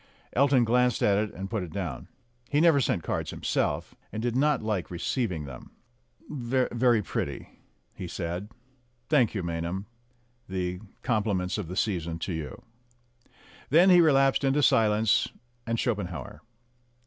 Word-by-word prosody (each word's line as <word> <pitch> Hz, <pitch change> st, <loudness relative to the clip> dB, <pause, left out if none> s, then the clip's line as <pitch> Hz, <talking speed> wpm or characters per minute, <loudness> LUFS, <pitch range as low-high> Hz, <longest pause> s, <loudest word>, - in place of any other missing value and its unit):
Elton 135 Hz, -1 st, +4 dB
glanced 125 Hz, 0 st, +2 dB
at 100 Hz, -1 st, +4 dB
it 105 Hz, 0 st, -1 dB
and 95 Hz, +1 st, -5 dB
put 110 Hz, -3 st, -1 dB
it 90 Hz, -3 st, -6 dB
down. 85 Hz, -9 st, -4 dB, 0.4 s
He 145 Hz, -, +2 dB
never 160 Hz, -4 st, +5 dB
sent 90 Hz, -8 st, 0 dB
cards -, -, -2 dB
himself, -, -, -1 dB, 0.2 s
and 110 Hz, -, -4 dB
did 120 Hz, +1 st, -1 dB
not 145 Hz, -1 st, +2 dB
like 105 Hz, -5 st, -2 dB
receiving 90 Hz, -, -2 dB
them. 65 Hz, -3 st, -10 dB, 0.5 s
"Very 125 Hz, -3 st, +1 dB
pretty," -, -, -4 dB, 0.4 s
he -, -, -7 dB
said. 90 Hz, +5 st, -4 dB, 0.6 s
"Thank 130 Hz, -8 st, +3 dB
you, 95 Hz, -, -2 dB
Maynham. 85 Hz, +3 st, -3 dB, 0.6 s
The 90 Hz, -1 st, -2 dB, 0.2 s
compliments 105 Hz, -4 st, 0 dB
of 100 Hz, -, -4 dB
the 90 Hz, +3 st, -6 dB
season 85 Hz, -5 st, -1 dB
to 90 Hz, +2 st, -4 dB
you." 80 Hz, -2 st, -6 dB, 1.1 s
Then 175 Hz, +6 st, +6 dB
he 175 Hz, -1 st, +8 dB
re 160 Hz, -2 st, +5 dB
lapsed 135 Hz, 0 st, +3 dB
into 140 Hz, +2 st, +2 dB
silence 110 Hz, -2 st, +3 dB, 0.4 s
and 115 Hz, 0 st, 0 dB
Schopenhauer. 90 Hz, -, -3 dB
105 Hz, 145 wpm, -27 LUFS, 90-125 Hz, 1.1 s, he